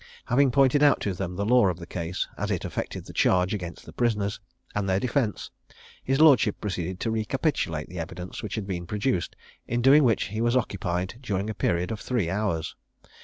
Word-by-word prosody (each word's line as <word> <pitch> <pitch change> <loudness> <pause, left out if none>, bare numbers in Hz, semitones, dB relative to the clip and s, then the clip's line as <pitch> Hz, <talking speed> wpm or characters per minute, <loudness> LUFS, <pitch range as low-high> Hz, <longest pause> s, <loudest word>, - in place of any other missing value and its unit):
Having 135 +3 +3
pointed 135 +2 +4
out 145 -2 +5
to 100 - -1
them 90 0 -4
the 100 +2 -2
law 120 -1 +5
of 90 -3 -1
the 85 - -8
case, 85 +1 -3
as - - -3
it - - -1
affected - - -4
the - - -10
charge 90 +1 +2
against 90 -4 -6
the - - -11
prisoners, 105 -4 0 0.3
and 100 -1 -1
their 95 0 +2
defence, 120 -2 -1 0.5
his 135 +2 0
lordship 135 -9 +5
proceeded 95 -2 -3
to 115 - 0
recapitulate 110 - -1
the 90 0 -7
evidence 90 +2 -6
which 105 -4 -4
had 110 -3 -3
been 90 -3 -4
produced, 105 -1 -1 0.3
in 120 - 0
doing 135 +5 +6
which 115 -6 +2
he 110 +2 -3
was 120 +2 +3
occupied 95 -2 -2
during 105 -4 -2
a - - -4
period 90 -1 0
of 110 - -4
three 110 -10 -1
hours. 95 -6 -1
105 Hz, 200 wpm, -26 LUFS, 90-120 Hz, 0.5 s, doing